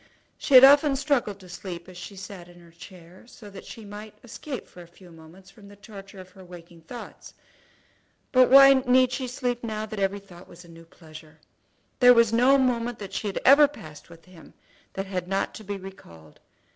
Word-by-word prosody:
She 280 - 0
had 255 - +10
often 280 +1 +6
struggled 265 -8 -2
to 185 - -15
sleep 175 -1 -9
as 185 - -14
she 180 +3 -10
sat 185 -2 -11
in 175 0 -18
her 170 -1 -19
chair, 175 +3 -16
so 210 -4 -15
that 195 - -12
she 225 - -11
might 210 +1 -11
escape 255 +3 -9
for 180 - -16
a 170 - -14
few 175 +1 -19
moments 165 +4 -17
from 200 -1 -18
the 205 - -15
torture 200 -2 -14
of 185 0 -14
her 190 0 -16
waking 175 -1 -15
thoughts. 235 +9 -12 1.0
But 255 -1 +4
why 275 +1 +8
need 255 -1 +2
she 255 0 -4
sleep 245 -1 -4
now 215 -1 -5
that 215 -1 -8
every 195 +1 -1
thought 185 -3 -17
was 175 +1 -16
a - - -18
new 165 0 -15
pleasure? 155 -1 -16 0.6
There 245 -1 +6
was 230 -1 +3
no 255 +4 +4
moment 240 -3 -1
that 195 -2 -10
she 210 - -4
had 195 - -5
ever 285 +2 +7
passed 155 - -14
with 165 -1 -17
him 180 -3 -18 0.4
that 195 - -5
had 185 -2 -5
not 195 +1 -3
to 220 - -11
be 205 0 -6
recalled. 85 - -15
200 Hz, 210 wpm, -24 LUFS, 175-245 Hz, 1.0 s, had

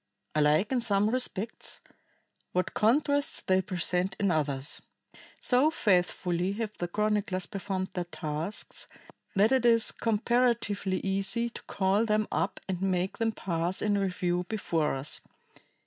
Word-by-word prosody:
Alike 155 - +3
in 255 -2 +2
some 210 -2 +2
respects, 230 -4 -3 0.7
what 180 0 0
contrasts 285 +5 +2
they 190 0 +3
present 180 0 -1
in 200 -3 +2
others. 145 -3 -2 0.6
So 260 +4 +5
faithfully 180 - +1
have 215 0 -4
the 175 - -1
chroniclers 205 -1 0
performed 190 -1 -3
their 180 -1 -2
tasks 160 +2 -5 0.5
that 205 +4 +4
it 260 -2 +3
is 230 -1 +4
comparatively 225 -4 +1
easy 195 +5 0
to - - -9
call 195 +3 +2
them 215 -1 +1
up 190 - -1
and 185 -2 -3
make 185 -1 0
them 225 -1 +2
pass 175 -3 -1
in 210 -1 +1
review 180 -2 0
before 165 -9 +1
us. 135 +2 -3
195 Hz, 130 wpm, -29 LUFS, 180-220 Hz, 0.7 s, So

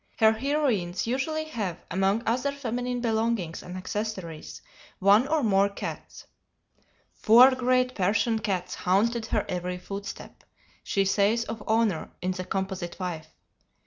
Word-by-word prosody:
Her 220 0 +6
heroines 225 - 0
usually 275 +6 -1
have, 215 - -4
among 195 +5 +1
other 255 +5 0
feminine 245 -2 -3
belongings 220 -7 -1
and 180 +1 -8
accessories, 185 -4 -5 0.3
one 205 +6 +5
or 310 -1 +1
more 200 -2 +3
cats. 200 - -7 0.9
"Four 240 +4 +7
great 255 0 +1
Persian 220 +3 +1
cats 185 -4 -2
haunted 220 +5 +1
her 215 - 0
every 180 0 -3
footstep," 200 +2 -8 0.4
she 195 -1 +1
says 205 +4 +2
of 225 -1 -6
Honor, 220 -6 +1
in 185 +1 -1
the 185 0 -5
"Composite 190 -1 -4
Wife." 170 -4 -4
215 Hz, 130 wpm, -27 LUFS, 185-240 Hz, 0.9 s, Four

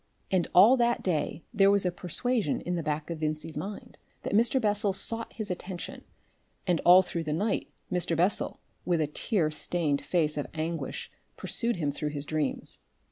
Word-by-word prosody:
And 185 -3 +2
all 215 +9 +8
that 240 -1 +2
day 160 -2 -1
there 195 -3 +5
was 200 -1 +3
a 180 - +2
persuasion 195 - -1
in 180 - -3
the 170 - -1
back 150 +1 -2
of 165 - -4
Vincey's 155 +1 -2
mind 200 +1 -6 0.2
that - - -3
Mr. 230 +5 +3
Bessel 205 -3 +1
sought 225 +4 -2
his 215 -4 -4
attention, 180 0 -6 0.6
and 175 -4 +1
all 180 +2 +8
through 170 -2 -3
the 150 - -1
night 205 +7 -1 0.2
Mr. 175 -2 0
Bessel 180 +4 +1 0.2
with 175 -2 +1
a 155 - +2
tear 155 +2 0
stained 150 -2 0
face 155 -4 +1
of 145 - -2
anguish 160 +1 -3 0.3
pursued 235 0 -1
him 150 -5 -1
through 150 +1 -3
his 145 -1 -4
dreams. 155 -2 -2
175 Hz, 180 wpm, -29 LUFS, 155-205 Hz, 0.6 s, all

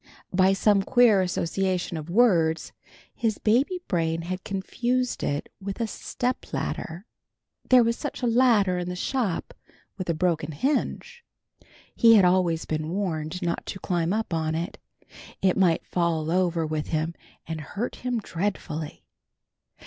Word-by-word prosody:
By 190 +1 +4
some 200 0 +3
queer 225 -2 +5
association 180 0 -1
of 155 0 -6
words 170 -7 +3 0.4
his 220 -3 -1
baby 270 - +1
brain 165 -2 0 0.2
confused 240 +6 -1
it 145 0 -2
with 195 +2 -5
a 230 - +1
step 245 +3 -3
ladder. 170 +5 -4 0.6
There 255 -1 +7
was 230 0 0
such - - -5
a - - +3
ladder 225 -6 +3
in 175 0 -3
the 180 - -4
shop 210 -2 -2 0.5
with 185 - -4
a 170 - +1
broken 160 -2 0
hinge. 300 - -2 0.7
He 230 -1 +7
was 200 - +6
always 180 -3 +2
being 155 0 -2
warned 175 -2 -3
not 170 -1 -1
to 190 - -5
climb 175 -2 -1
up 220 -3 -1
on 160 -1 0
it. 170 +4 -4 0.6
It 185 -1 +2
might 180 -4 +2
fall 165 -3 0
over 175 -2 +1
with 155 -1 -3
him 160 +1 -1 0.3
and 160 -1 -5
hurt 205 +10 -4
him 250 -1 -2
dreadfully. 170 -6 -4
185 Hz, 145 wpm, -26 LUFS, 165-225 Hz, 0.7 s, There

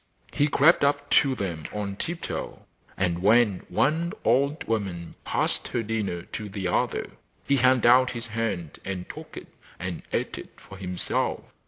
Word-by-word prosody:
He 145 - +3
crept 150 +3 +5
up 145 0 +1
to 135 -2 +5
them 85 -8 -4
on 100 -1 -3
tiptoe, 170 - -5 0.3
and 90 -2 0
when 105 -1 +4
one 160 +5 +1
old 140 +6 +2
woman 95 -7 -3
passed - - -1
her 120 - -1
dinner 105 -6 -2
to 105 +3 -6
the 95 -1 -3
other - - 0 0.3
he 140 - +3
held 130 -1 +4
out 125 +2 +6
his 120 -2 -4
hand 105 -8 -3
and 95 -2 -4
took - - -9
it - - -9 0.3
and - - -4
ate - - -2
if - - -8
for 95 - -12
himself. 90 -2 -1
115 Hz, 160 wpm, -26 LUFS, 95-135 Hz, 0.3 s, out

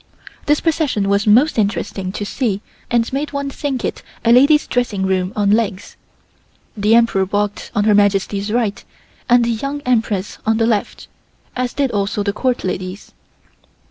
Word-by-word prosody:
This 295 0 +3
procession 290 -11 0
was 200 +1 +1
most 240 +5 +4
interesting 200 -2 -2
to 205 - -4
see 205 -3 -2 0.3
and 235 +1 0
made 290 +2 -2
one 280 0 -3
think 270 -3 -3
it - - -4 0.2
a 230 - +5
lady's 285 +5 +5
dressing 225 -6 -1
room 185 -1 0
on 205 -1 +2
legs. 205 -3 -1 0.8
The 210 +1 +3
Emperor 230 -5 +3
walked 205 +1 -2
on 205 - +2
Her 210 0 +4
Majesty's 200 0 +1
right 225 -3 -1 0.5
and 240 0 +5
the 235 - 0
Young 275 +6 -3
Empress 220 -6 -1
on 220 0 +1
the 225 - +2
left, 220 -3 -1 0.5
as 250 -1 -2
did 275 -3 0
also 205 0 -1
the 200 -1 -1
Court 250 +3 -1
ladies. 185 +1 -5
215 Hz, 165 wpm, -18 LUFS, 200-250 Hz, 0.8 s, a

